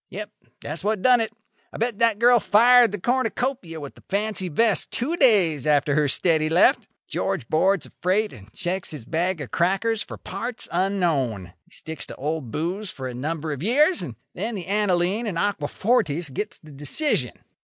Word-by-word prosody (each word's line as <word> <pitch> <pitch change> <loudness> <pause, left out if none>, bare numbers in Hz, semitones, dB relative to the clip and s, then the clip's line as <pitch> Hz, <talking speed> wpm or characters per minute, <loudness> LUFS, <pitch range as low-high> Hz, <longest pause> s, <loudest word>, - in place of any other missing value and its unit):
Yep. 210 +2 -7 0.3
That's 155 +4 -5
what 210 -1 -1
done 250 -2 +5
it. 220 - -2 0.4
I - - -9
bet 230 -2 -2
that 230 -3 +3
girl 240 +2 +5
fired 240 +2 +5
the 205 - -4
cornucopia 245 -6 -1
with 145 -2 -8
the - - -18
fancy 200 -2 -1
vest 220 +6 +2
two 295 +8 -2
days 185 - +3
after 145 -1 +3
her 150 0 +2
steady 155 +2 +2
left. 180 - +3 0.2
George 190 -11 -2
boards 190 +3 +2
a - - -15
freight 195 +3 +1
and 105 -4 -14
checks 180 - -2
his 150 -8 -8
bag 170 +2 -1
of 135 - -7
crackers 195 +5 +1
for - - -7
parts 230 +6 -5
unknown. 155 - 0
He - - -31
sticks 160 0 -5
to - - -8
Old 150 -2 -3
Booze 180 - -3
for 130 -7 -6
a 125 - -6
number 155 +5 -3
of 140 - -7
years; 295 - +3
and 120 - -6 0.2
then 220 +5 -3
the 185 -4 -6
aniline 200 +2 0
and 185 -5 -3
aquafortis 170 - 0
gets 210 +9 -4
the 155 - -15
decision. 145 - -1
185 Hz, 185 wpm, -24 LUFS, 155-220 Hz, 0.4 s, done